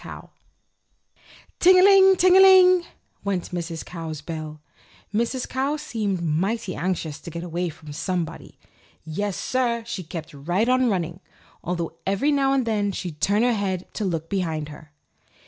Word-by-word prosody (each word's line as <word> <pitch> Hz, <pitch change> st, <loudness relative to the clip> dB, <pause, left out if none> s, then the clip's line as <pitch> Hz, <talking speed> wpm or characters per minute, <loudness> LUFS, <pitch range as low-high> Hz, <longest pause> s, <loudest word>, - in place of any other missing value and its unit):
COW -, -, -10 dB, 1.3 s
"TING 370 Hz, +1 st, +7 dB
A -, -, +6 dB
LING! 385 Hz, -1 st, +7 dB
ting 365 Hz, 0 st, +4 dB
a -, -, +8 dB
ling!" 370 Hz, -2 st, +7 dB, 0.4 s
went 195 Hz, -3 st, -2 dB
Mrs. 170 Hz, -2 st, -5 dB
Cow's 160 Hz, -4 st, -6 dB
bell. 155 Hz, -1 st, -7 dB, 0.5 s
Mrs. 235 Hz, +4 st, -1 dB
Cow 270 Hz, +3 st, -1 dB
seemed 215 Hz, -, -3 dB
mighty 185 Hz, +6 st, -1 dB
anxious 170 Hz, -4 st, -3 dB
to -, -, -9 dB
get 170 Hz, +1 st, -6 dB
away 175 Hz, 0 st, -3 dB
from 155 Hz, -2 st, -11 dB
somebody. 175 Hz, +1 st, -4 dB, 0.5 s
Yes, 190 Hz, +5 st, -3 dB
sir! 240 Hz, -3 st, -1 dB
she 230 Hz, -5 st, -5 dB
kept 165 Hz, -1 st, -8 dB
right 175 Hz, +10 st, -1 dB
on 255 Hz, 0 st, +3 dB
running, 175 Hz, -3 st, -2 dB, 0.4 s
although 170 Hz, -2 st, -3 dB
every 200 Hz, +10 st, +1 dB
now 275 Hz, -2 st, +2 dB
and 270 Hz, -2 st, +1 dB
then 210 Hz, -3 st, 0 dB
she'd 175 Hz, -5 st, -6 dB
turn 205 Hz, +5 st, +2 dB
her 245 Hz, 0 st, +3 dB
head 190 Hz, -4 st, -2 dB
to 215 Hz, -, -3 dB
look 165 Hz, -4 st, -2 dB
behind 165 Hz, -6 st, -2 dB
her. 150 Hz, 0 st, -13 dB
190 Hz, 160 wpm, -24 LUFS, 165-245 Hz, 1.3 s, a